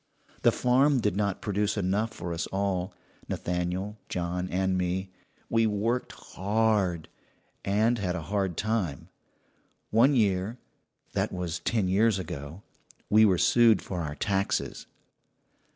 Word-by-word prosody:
"The - - +5
farm 130 +3 +3
did 105 -5 0
not 100 -2 -1
produce 105 +1 0
enough 100 +4 0
for 85 -5 -5
us 85 - -3
all 95 -2 -1 0.4
Nathaniel, 90 +4 -2
John, 90 +1 -2
and 95 0 0
me. 90 +1 -1 0.4
We 115 -1 +2
worked 110 +4 -1
hard, 100 -4 0 0.6
and 110 +4 +2
had 90 -3 -1
a 85 - -4
hard 95 -2 -1
time. 105 -10 -2 0.8
One 130 +6 +5
year 100 0 +1 0.6
that - - 0
was 85 -2 -3
ten 105 +2 0
years 105 +3 +3
ago 85 -1 -7 0.5
we 110 +1 +7
were 95 -4 +4
sued 115 +2 +4
for 90 -2 -4
our 75 -2 -4
taxes. 95 +5 -1
100 Hz, 130 wpm, -28 LUFS, 90-110 Hz, 0.8 s, we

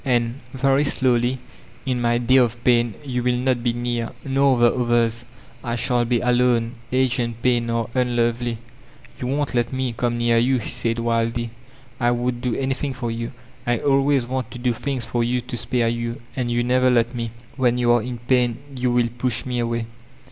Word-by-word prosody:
And" 120 -1 0 0.2
—very 135 +2 +3
slowly 125 -3 +2 0.3
— - - -25
^"in 130 -2 0
my 120 0 +2
day 120 +2 +3
of 120 -2 +2
pain, 120 -3 +3
you 125 -2 -2
will 125 0 +1
not 125 -1 +1
be 120 -1 0
near, 120 -1 -2 0.2
nor 135 -1 +3
the 120 -1 +4
others. 120 -1 +1 0.4
I 120 0 -2
shall 120 0 +1
be 120 0 +1
alone; 120 -2 +2 0.2
age 130 0 +2
and 120 -1 -2
pain 120 -1 +1
are 115 -1 0
un* 125 -2 +1
tovely.'' 120 0 0 0.6
'You 125 - -3
won't 145 +1 -1
let 120 -1 +1
me 130 -2 -2
come 120 0 -1
near 120 0 +3
you," 130 +3 +3
he 115 - -2
said 115 -1 -1
wildly. 115 0 -1 0.5
"I 120 -1 +3
would 120 0 -1
do 125 -2 -1
anything 135 +1 -2
for 120 -3 -3
you. 115 +1 -4 0.4
I 120 0 +2
always 135 -1 +2
want 130 -1 -3
to 125 - -8
dp 120 -2 -1
things 130 -3 -2
for 120 -1 -1
you 125 +1 +1
to 125 +1 -6
spare 120 0 0
you, 115 0 -3 0.2
and 125 -2 -1
you 120 0 +1
never 130 +1 +3
let 120 -1 +2
me. 115 -2 -3 0.3
When 125 -3 +2
you 120 -1 +3
are 120 -1 +4
in 125 +1 -5
pain 125 -3 +2 0.2
you 125 -1 0
will 120 -1 +2
push 125 -2 0
me 125 -1 -2
away." 115 -1 -1
120 Hz, 205 wpm, -22 LUFS, 120-125 Hz, 0.6 s, the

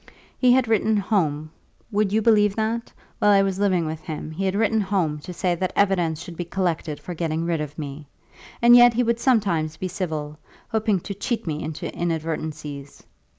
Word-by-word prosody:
He 250 -1 +4
had 255 -2 +3
written 220 0 +2
home, 155 -7 0 0.4
would 205 -1 +1
you 220 +1 +1
believe 210 -3 +4
that? 225 +1 -2 0.3
while 210 - +4
I 200 -1 +6
was 195 -1 -1
living 185 -4 +2
with 155 0 -4
him 155 0 -6
he 190 +5 -3
had 190 0 0
written 220 +1 +2
home 185 -7 0
to 165 - -9
say 180 0 0
that 185 +2 -2
evidence 175 -6 +2
should 175 -2 -9
be 175 - -3
collected 170 -4 -2
for 180 - -7
getting 165 -1 -2
rid 165 -2 0
of 150 0 -6
me. 145 -1 -7 0.6
And 240 0 +8
yet 240 -1 +7
he 245 - +2
would 235 0 0
sometimes 175 - +1
be 185 - -3
civil, 155 -5 -4 0.3
hoping 220 -4 +1
to 200 - -5
cheat 235 +4 -3
me 155 -2 -3
into 155 -1 -5
inadvertencies. 155 -4 -4
185 Hz, 195 wpm, -23 LUFS, 155-210 Hz, 0.6 s, And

